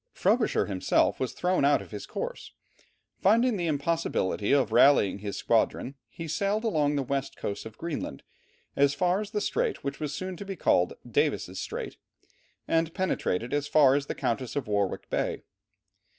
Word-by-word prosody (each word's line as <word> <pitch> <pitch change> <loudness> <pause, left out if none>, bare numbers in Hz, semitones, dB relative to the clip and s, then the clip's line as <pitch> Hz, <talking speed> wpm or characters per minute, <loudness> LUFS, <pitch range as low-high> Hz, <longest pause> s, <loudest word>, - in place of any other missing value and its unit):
Frobisher - - +2
himself 95 -3 +1
was 130 - -2
thrown 180 -3 +1
out 145 +1 +4
of - - -11
his - - -7
course. - - -5 0.7
Finding 230 +5 +4
the 175 -3 -1
impossibility 145 - 0
of 140 -5 +3
rallying 115 -5 +5
his 100 0 -5
squadron, 130 - +1 0.2
he 165 +6 -7
sailed 200 +7 0
along 150 -9 +1
the 140 - 0
west 135 +1 -3
coast 100 +2 -4
of 110 - -14
Greenland, 155 - -5 0.5
as 140 0 +3
far 180 +4 +1
as 210 - -6
the 210 - -1
strait 470 - -1
which 140 0 -4
was 150 -2 -3
soon 185 +5 -4
to - - -6
be 195 -1 -5
called 90 - +2
Davis' - - 0
Strait, - - -5 0.7
and 165 0 +1
penetrated 125 - -1
as 145 0 0
far 145 -3 +5
as 140 0 0
the - - -3
Countess 120 +1 -2
of 145 - -2
Warwick 100 -2 -1
Bay. - - -1
145 Hz, 170 wpm, -28 LUFS, 130-185 Hz, 0.7 s, rallying